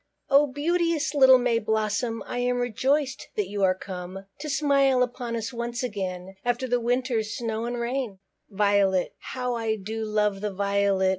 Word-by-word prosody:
Oh, 285 Hz, +2 st, +6 dB
beauteous, 315 Hz, +2 st, 0 dB
little 265 Hz, -2 st, +7 dB
May 245 Hz, -2 st, +1 dB
blossom, 220 Hz, +1 st, -1 dB
I 245 Hz, -, -4 dB
am 245 Hz, 0 st, +1 dB
rejoiced 260 Hz, +4 st, 0 dB
that 210 Hz, -3 st, 0 dB
you 205 Hz, 0 st, -3 dB
are 185 Hz, -1 st, +4 dB
come, 185 Hz, 0 st, -7 dB
To 305 Hz, +1 st, -5 dB
smile 275 Hz, -2 st, +3 dB
upon 245 Hz, -1 st, -4 dB
us 225 Hz, +2 st, -4 dB
once 240 Hz, +1 st, -3 dB
again, 190 Hz, -4 st, -4 dB
After 245 Hz, +1 st, 0 dB
the 245 Hz, 0 st, +1 dB
winter's 240 Hz, -2 st, -1 dB
snow 225 Hz, -1 st, -2 dB
and 240 Hz, 0 st, -3 dB
rain. 240 Hz, -3 st, -2 dB, 0.3 s
VIOLET. 200 Hz, -2 st, +2 dB
How 250 Hz, -1 st, -3 dB
I 225 Hz, -2 st, -1 dB
do 220 Hz, +2 st, -5 dB
love 210 Hz, -2 st, 0 dB
the 210 Hz, -1 st, -2 dB
Violet! 200 Hz, -1 st, +1 dB
230 Hz, 165 wpm, -26 LUFS, 205-255 Hz, 0.3 s, little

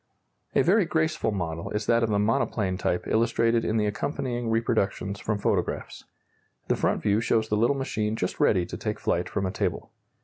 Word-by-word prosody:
A -, -, +5 dB
very 195 Hz, +3 st, +4 dB
graceful 160 Hz, -6 st, 0 dB
model 85 Hz, -4 st, -3 dB
is 105 Hz, 0 st, -2 dB
that 115 Hz, +1 st, +3 dB
of 115 Hz, -, +1 dB
the 105 Hz, -, +2 dB
monoplane 105 Hz, -2 st, +1 dB
type 90 Hz, -1 st, -1 dB
illustrated 115 Hz, 0 st, +2 dB
in 110 Hz, -, 0 dB
the 105 Hz, -, +2 dB
accompanying 120 Hz, +2 st, -2 dB
reproductions 105 Hz, -3 st, 0 dB
from 105 Hz, -1 st, -1 dB
photographs. 100 Hz, -, -2 dB, 0.6 s
The -, -, +3 dB
front -, -, 0 dB
view 105 Hz, +2 st, +2 dB
shows 110 Hz, -1 st, +1 dB
the 105 Hz, -, +1 dB
little 120 Hz, +6 st, +2 dB
machine 110 Hz, -5 st, -1 dB
just 90 Hz, -, -3 dB
ready 90 Hz, -4 st, +3 dB
to -, -, -7 dB
take -, -, -3 dB
flight -, -, 0 dB
from 95 Hz, -, -1 dB
a 95 Hz, -, -1 dB
table. -, -, -3 dB
110 Hz, 190 wpm, -26 LUFS, 100-115 Hz, 0.6 s, A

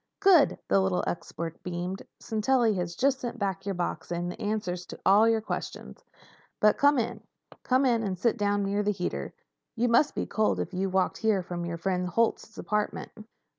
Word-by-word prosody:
"Good!" 375 Hz, -7 st, +5 dB
The -, -, +4 dB
little 190 Hz, -1 st, 0 dB
art -, -, 0 dB
expert 165 Hz, -1 st, -5 dB
beamed. 180 Hz, +2 st, -4 dB, 0.2 s
"Sintelli 225 Hz, +1 st, +1 dB
has 175 Hz, -2 st, -3 dB
just 270 Hz, +1 st, +2 dB
sent 240 Hz, -1 st, -5 dB
back 195 Hz, -3 st, -3 dB
your 195 Hz, -, -1 dB
box, 175 Hz, -2 st, -3 dB
and 175 Hz, +1 st, -2 dB
the -, -, -10 dB
answers 205 Hz, -4 st, -2 dB
to -, -, -9 dB
all 210 Hz, +4 st, +6 dB
your 225 Hz, -1 st, +2 dB
questions. -, -, -6 dB, 0.6 s
But 210 Hz, 0 st, +4 dB
come 285 Hz, 0 st, +5 dB
in. 235 Hz, -1 st, -2 dB, 0.4 s
Come 260 Hz, +1 st, +2 dB
in 235 Hz, -3 st, +3 dB
and 195 Hz, -4 st, -2 dB
sit 225 Hz, +5 st, +1 dB
down 205 Hz, -2 st, 0 dB
near 200 Hz, +1 st, 0 dB
the 205 Hz, -, 0 dB
heater. 185 Hz, -4 st, -3 dB, 0.4 s
You 240 Hz, +1 st, +1 dB
must 235 Hz, +6 st, +3 dB
be -, -, -1 dB
cold 215 Hz, -1 st, 0 dB
if -, -, -4 dB
you 190 Hz, +2 st, 0 dB
have 185 Hz, -, -6 dB
walked 190 Hz, -, +1 dB
here 215 Hz, -4 st, +2 dB
from 175 Hz, -1 st, -5 dB
my 170 Hz, 0 st, -3 dB
friend 180 Hz, +1 st, -1 dB
Holt's 225 Hz, +1 st, 0 dB
apartment." 210 Hz, 0 st, -2 dB
205 Hz, 200 wpm, -28 LUFS, 180-230 Hz, 0.6 s, all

